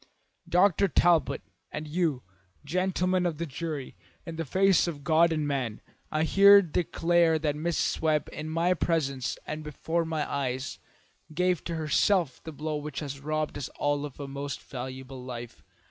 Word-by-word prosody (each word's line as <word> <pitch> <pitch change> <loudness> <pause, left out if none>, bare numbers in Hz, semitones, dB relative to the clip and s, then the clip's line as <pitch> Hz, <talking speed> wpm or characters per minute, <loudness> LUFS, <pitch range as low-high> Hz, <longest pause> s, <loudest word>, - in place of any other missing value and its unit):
Dr. 195 +2 +4
Talbot, 175 -1 +3 0.3
and 150 +1 -5
you, 155 -5 0 0.4
gentlemen 185 +2 +1
of 165 -3 -3
the 170 - -2
jury, 150 -1 -5 0.3
in 165 - -6
the 165 0 -3
face 190 +3 +3
of 145 -4 -5
God 165 +3 +4
and 155 -2 0
man, 130 -6 -2 0.3
I 155 0 +1
here 200 +4 +7
declare 170 0 +2
that 155 -2 0
Mrs. 160 +3 -1
Webb, 155 -2 +2
in 155 +1 -5
my 165 +3 +2
presence 140 -7 -1
and 155 0 -5
before 160 +3 -2
my 160 -2 -2
eyes, 130 -1 -3 0.6
gave 180 0 +1
to 170 - -3
herself 160 0 +1
the 160 - -6
blow 155 +1 -3
which 150 -1 -5
has 140 -2 -5
robbed 155 +1 -2
us 135 - -4
all 145 0 0
of 145 -2 -7
a 140 - -5
most 140 -1 -5
valuable 130 0 -7
life. 120 -2 -8
155 Hz, 160 wpm, -28 LUFS, 140-170 Hz, 0.6 s, here